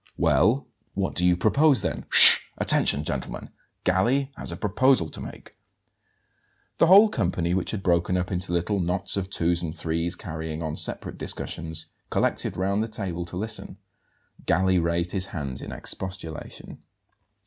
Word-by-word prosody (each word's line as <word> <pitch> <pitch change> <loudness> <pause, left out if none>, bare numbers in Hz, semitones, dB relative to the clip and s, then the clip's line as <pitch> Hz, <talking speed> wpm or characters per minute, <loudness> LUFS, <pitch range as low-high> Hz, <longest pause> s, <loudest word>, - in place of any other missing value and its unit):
"Well, 120 +8 +2 0.3
what 95 -1 -2
do 90 - -1
you 90 -1 +3
propose, 130 - +2
then? - - -3
Sh! - - +10 0.2
Attention, 70 - +4
gentlemen! - - -5 0.3
Galli 125 +10 +1
has - - -5
a - - -6
proposal 105 -3 +1
to - - -6
make." - - -11 1.2
The 165 - +5
whole 200 +5 +8
company, 90 - -2
which 95 -1 -2
had 100 -3 -4
broken 90 +1 +1
up 90 +1 -3
into 90 -1 -3
little 90 +4 -1
knots 90 +1 -1
of 95 -1 -3
twos 85 -2 0
and 85 -1 -6
threes, 85 +2 -2
carrying 80 -2 -6
on 80 -1 -4
separate - - -3
discussions, 80 -1 -4 0.2
collected - - -1
round 100 +3 0
the 110 - -2
table 95 -6 -4
to 90 +1 -8
listen. 110 +4 -5 0.7
Galli 95 -1 +2
raised 85 +1 -1
his 95 -1 -1
hands 70 -8 -6
in - - -8
expostulation. 90 -4 -6
90 Hz, 155 wpm, -24 LUFS, 85-100 Hz, 1.2 s, Sh